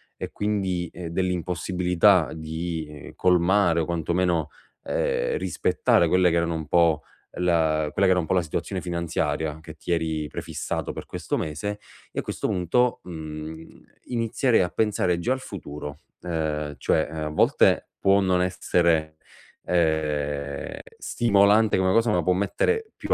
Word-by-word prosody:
e - - -6
quindi 95 -4 -1 0.2
dell'impossibilità 90 +1 +2
di 80 -2 -5
colmare, 90 0 +3
o - - -1
quantomeno, 85 -1 0 0.3
ehm, - - 0
rispettare 460 - +2
quelle 90 -1 +4
che 85 - 0
erano 85 0 0
un 80 -2 -5
po' 80 -1 +3 0.4
la 80 -3 +2
quella 100 - +2
che 95 - +5
era 90 - +2
un 85 - -2
po' 80 - 0
la 90 - +3
situazione 90 +3 -3
finanziaria 85 -3 -2
che 80 0 -10
ti 80 - -6
eri 80 -2 0
prefissato - - -4
per - - -7
questo - - -3
mese, 100 +8 -3 0.3
io - - -2
a - - -14
questo - - -3
punto, 105 +8 +1
mhmm, 80 -1 -8 0.2
inizierei 120 0 +1
a 90 - 0
pensare 100 -4 +1
già 120 +9 +1
al 130 - -4
futuro, 75 - -8 0.2
ehm, 75 -4 -2
cioè, 80 - +1
ehm, - - -7
a - - -2
volte 75 - +3
può 100 +1 +4
non 90 -1 +2
essere, 85 -3 +1 0.5
ehm, 75 -4 -1 0.2
stimolante 105 -1 +3
una 95 0 +2
cosa, 115 +3 +3
ma 90 -4 +1
può 90 - +3
mettere 435 - 0
più - - -2
85 Hz, 150 wpm, -25 LUFS, 80-95 Hz, 0.5 s, che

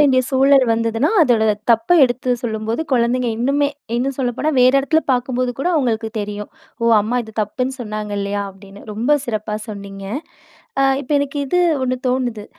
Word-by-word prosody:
வேண்டிய 265 -3 +5
சூழல் 270 0 +5
வந்ததுனா, 230 +6 0
அதோட 230 -5 +3 0.2
தப்ப 225 0 +3 0.2
எடுத்து 250 0 -1
சொல்லும்போது 225 +4 -2
குழந்தைங்க 245 0 +2
இன்னுமே 280 +4 +1 0.3
இன்னும் 265 +2 -1
சொல்லப்போனா, 260 +4 -1
வேற 255 +1 +6
இடத்தில 315 +4 +2
பார்க்கும்போது 250 0 -1
கூட 350 - 0
அவுங்களுக்கு 230 -6 0
தெரியும். 205 0 -6 0.3
"ஓ! - - +1 0.2
அம்மா 235 +4 -1
இது 220 - -12
தப்புன்னு 255 +5 -2
சொன்னாங்க. 215 -2 -5
இல்லயா?" 200 0 -2
அப்பிடின்னு. 195 +1 -14
ரொம்ப 240 +8 +2
சிறப்பா 215 -3 -3
சொன்னீங்க. 200 -1 -8 0.8
அ 275 - +4 0.2
இப்ப 280 +1 -12
எனக்கு 285 0 -2
இது 360 +6 +1 0.2
1 255 0 0
தோணுது. 250 -4 -1
245 Hz, 155 wpm, -19 LUFS, 215-265 Hz, 0.8 s, வேற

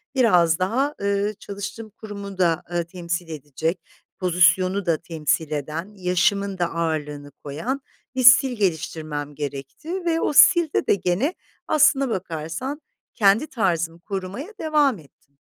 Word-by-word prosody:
biraz 180 -10 +4
daha, 255 +11 0
ııı, 200 +1 0
çalıştığım 205 +2 -7
kurumu 200 -2 -9
da, 175 -1 +2
ııı, 175 -1 -1
temsil 175 0 -4
edecek, 155 +3 -3 0.4
pozisyonu 185 +1 +3
da 165 -3 +2
temsil 160 -1 -2
eden, 155 +7 -4
yaşımın 190 +2 +1
da 175 - +1
ağırlığını 150 -3 -3
koyan, 165 - -4 0.3
bir 260 - 0
stil 255 +1 +7
geliştirmem 155 -6 -2
gerekti 150 - -6
ve 330 -1 +1
o - - 0
stilde 325 +2 +5
de - - +4
gene 195 - 0 0.3
aslına 275 -3 +4
bakarsan 185 - -4 0.3
kendi 210 +6 +3
tarzımı 170 - -1
korumaya 195 - -6
devam 295 - +2
ettim. 140 -1 -23
185 Hz, 130 wpm, -23 LUFS, 160-225 Hz, 0.4 s, stil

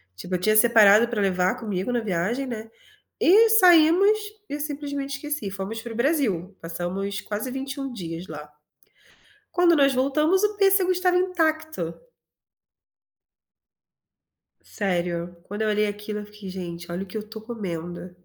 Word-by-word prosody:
Tipo 180 - -4
eu - - -1
tinha 215 +4 +2
separado 220 -1 +6
para 230 -3 -1
levar 185 -1 +1
comigo 205 -1 -3
na 240 -1 0
viagem, 215 +6 -1
né, 225 -2 -6 0.5
e 440 +6 +6
saímos 365 +1 +6 0.3
e 290 - -4
simplesmente 285 -1 -4
esqueci. 295 -8 -4
Fomos 195 +4 -5
para 235 -1 -7
o - - -9
Brasil, 235 - 0
passamos 185 +5 -4
quase 215 +5 -4
21 270 +1 -5
dias 170 -3 -6
lá. 150 -1 -9 1.0
Quando 350 -1 +4
nós 275 -2 +4
voltamos 300 +9 +2
o 420 0 0
pêssego 390 -2 +4
estava 365 0 +1
intacto. 315 - -1 2.7
Sério, 175 -3 -3
quando 205 +3 -5
eu 215 - +1
olhei 210 0 +2
aquilo 210 +1 -5
eu 210 - -7
fiquei: 210 -2 -11
"Gente, 175 -2 -7
olha 180 +3 -3
o - - -16
que 185 - -9
eu - - -1
estou 220 +1 -9
comendo". 180 -6 -6
220 Hz, 150 wpm, -24 LUFS, 185-295 Hz, 2.7 s, separado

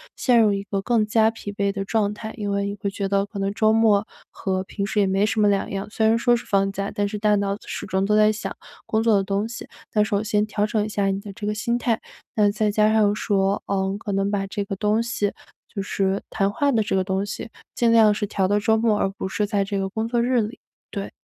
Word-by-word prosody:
陷 245 -3 +3
入 210 -2 +4
一 200 0 -2
个 200 0 -3
更 225 0 +2
加 220 +1 +3
疲 225 -2 -7
惫 200 -1 -1
的 195 -1 -3
状 205 0 0
态。 220 +1 -7
因 205 -2 -3
为 200 0 0
你 200 - -4
会 200 0 -3
觉 195 0 -3
得 200 0 +2
可 205 +1 -10
能 195 0 -1
周 215 +1 +3
末 215 -2 +3 0.2
和 190 -1 -2
平 200 +1 -4
时 210 - -1
也 195 - +2
没 195 +2 +2
什 215 0 0
么 210 - +5
两 200 -1 0
样， 195 +1 -4
虽 220 0 +1
然 225 +1 +4
说 240 +1 +3
是 - - -9
放 195 -1 +1
假， 195 +1 -3
但 205 - +1
是 210 +1 -4
大 210 0 +3
脑 200 0 -1
始 - - -5
终 190 0 0
都 210 +1 +2
在 215 0 +5
想 215 - -5 0.3
工 220 - 0
作 225 -2 +4
的 195 - +2
东 200 +2 -1
西。 230 - -8 0.3
那 210 - +3
首 210 -1 0
先 210 -1 +1
调 210 0 -1
整 210 0 0
一 - - -3
下 205 -1 0
你 195 0 0
的 200 0 -9
这 205 - -7
个 210 - 0
心 235 +3 -1
态， 235 -2 0 0.4
那 210 -2 +4
再 210 0 0
加 215 +1 +3
上 210 -2 +4
说， 200 -2 0
嗯， 195 0 -1
可 210 -1 -5
能 195 +1 +1
把 200 -1 -1
这 205 +1 -3
个 195 0 -4
东 210 +3 +1
西 230 -3 -1 0.4
就 200 - -3
是 195 0 -1
谈 195 -2 0
话 285 +6 +1
的 225 -4 +2
这 205 - -1
个 190 - +2
东 190 +1 -1
西 215 +2 -6 0.3
尽 235 -1 +3
量 220 -2 +6
是 205 0 -2
调 195 -1 0
到 205 +2 +2
周 220 +2 +2
末， 220 -1 +2
而 - - +1
不 195 - -5
是 210 +2 0
在 200 -1 +1
这 200 0 -3
个 195 - -1
工 220 +3 -2
作 235 0 +1
日 245 0 +2
里， 215 +2 -5 0.3
对。 200 -1 -5
205 Hz, 290 characters per minute, -23 LUFS, 195-220 Hz, 0.4 s, 量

